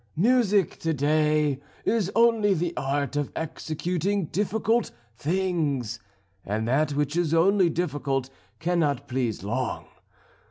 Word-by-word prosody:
Music, 210 -2 +3
to 165 -1 -1
day, 150 0 +2 0.3
is 215 -4 +1
only 225 -4 +4
the 175 0 -1
art 140 +1 -1
of 145 -2 -1
executing 170 +4 -2
difficult 215 +6 0 0.3
things, 150 - -1 0.4
and 110 +3 -2
that 145 +4 +2
which 145 +1 -1
is 170 -2 +1
only 185 +2 +4
difficult 145 -5 -2 0.3
cannot 155 -3 0
please 120 -6 -2
long. 120 +4 -2
155 Hz, 115 wpm, -26 LUFS, 140-190 Hz, 0.4 s, only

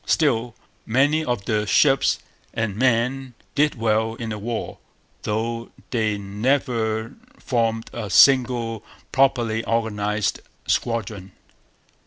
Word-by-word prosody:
Still, 120 -6 +1 0.3
many 140 +7 +2
of 120 -8 -2
the 105 -2 0
ships 135 +5 +4 0.4
and 115 -3 -1
men 125 +2 0 0.2
did 150 +1 +2
well 110 -1 0
in 115 -1 -5
the 105 -1 -4
war, 115 +2 -4 0.4
though 115 +2 -2 0.2
they 110 -4 0
never 110 +2 -1 0.2
formed 115 -2 -1
a 110 -4 -5
single 120 0 +4 0.3
properly 120 -5 +2
organized 105 -2 -1 0.3
squadron. 105 -5 -2
115 Hz, 105 wpm, -23 LUFS, 110-125 Hz, 0.4 s, ships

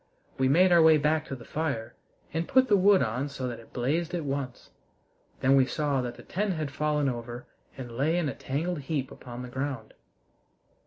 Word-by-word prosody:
We 130 0 +3
made 180 +6 +5
our 170 -1 +7
way 160 -1 +7
back 155 +1 +1
to 135 - -4
the 120 - -12
fire 140 -8 -3 0.4
and 165 +1 -1
put 260 0 +4
the 205 - +6
wood 195 -2 +5
on 125 +5 -2
so 135 -2 -4
that 120 -2 -5
it 115 - -16
blazed 160 +8 -1
at 165 -3 -3
once. 135 -2 -4 0.7
Then 135 +1 +5
we 130 -1 +4
saw 145 -3 0
that 120 -1 -4
the - - -13
tent 200 +1 -1
had 155 -3 -3
fallen 150 -1 0
over 120 -1 -5 0.3
and 125 -3 -7
lay 155 +7 +1
in 175 -4 0
a 140 - -2
tangled 160 +5 -3
heap 140 -2 -3
upon 125 0 -8
the - - -6
ground. 130 -3 -4
140 Hz, 205 wpm, -28 LUFS, 130-160 Hz, 0.7 s, our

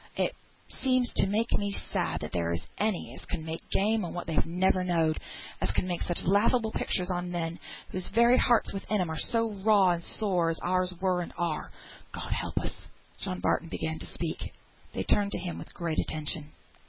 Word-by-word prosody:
It - - +1 0.5
seems 255 -2 +2
to - - +5
make 220 +4 +1
me 205 0 +1
sad - - -1
that - - -5
there 85 -1 0
is 85 - -2 0.2
any 210 -3 0
as - - -9
can 160 -3 -4
make 160 0 -4
game 215 +2 +2
on 175 - -4
what 175 - -3
they've 160 -3 +1
never 185 +2 +2
knowed; 165 -3 +2 0.4
as 90 - +1
can 110 - 0
make 175 -2 -2
such 175 - +1
laughable 220 +4 +3
pictures 185 -3 0
on 175 0 -2
men, 170 -1 -2 0.3
whose 185 -1 -2
very 235 +3 +5
hearts 240 -3 +3
within 200 +1 -1
'em 175 -3 0
are 160 - -2
so 230 -1 +1
raw 200 -4 +6
and 170 -1 -1
sore 180 -6 +1
as 165 - 0
ours 185 0 +2
were 185 -1 +2
and 175 - -6
are, 170 -3 -1 0.4
God - - -5
help - - -3
us." - - -3 0.5
John - - -3
Barton - - +1
began 80 0 -2
to - - -7
speak; - - -4 0.4
they 95 - -2
turned 200 - +2
to - - -1
him 175 -2 -4
with - - -9
great 170 -2 -1
attention. 155 0 -1
180 Hz, 205 wpm, -29 LUFS, 165-205 Hz, 0.5 s, raw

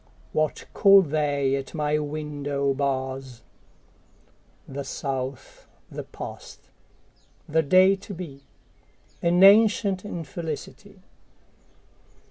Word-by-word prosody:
What 155 -1 -1
call 195 -1 +7
they 145 -3 0
at 135 +2 -6
my 150 -1 0
window 145 -2 -2
bars? 130 -2 -3 1.2
The 140 +1 -6
South, 135 -1 -5 0.2
the - - -5
past, - - -10 0.8
the 160 +2 +2
day 185 +6 +5
to 200 +1 -10
be, 155 -6 -9 0.8
An 175 +2 +3
ancient 200 -1 +5
infelicity. 175 +2 -7
150 Hz, 90 wpm, -25 LUFS, 140-185 Hz, 1.2 s, call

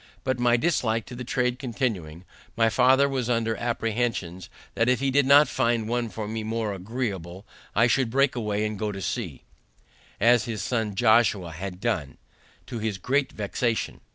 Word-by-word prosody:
But 130 -2 -1
my 120 0 +4
dislike 115 -7 0
to 125 - -9
the 125 - -6
trade 125 0 -1
continuing, 105 - -3 0.3
my 115 -1 +4
father 130 +4 +4
was 130 -3 -2
under 115 -2 +1
apprehensions 115 -6 -2 0.2
that 115 +2 +1
if 125 - +3
he 135 0 0
did 140 0 +3
not 145 +2 +7
find 115 -3 0
one 120 0 -1
for 110 -1 -5
me 110 +1 -3
more 110 -1 -2
agreeable, 95 -3 -5 0.3
I 115 - +5
should 125 +1 +2
break 135 +2 +2
away 105 -3 -1
and 105 -2 -4
get 105 -1 -2
to 95 - -6
sea, 90 - -4 0.8
as 120 +2 +4
his 115 -3 -4
son 110 -5 -1
Josiah 110 -5 +3
had 90 +3 -6
done, 95 -11 -2 0.5
to 120 - -6
his 110 -2 -2
great 135 +7 0
vexation. 110 +2 -2
115 Hz, 175 wpm, -26 LUFS, 105-125 Hz, 0.8 s, not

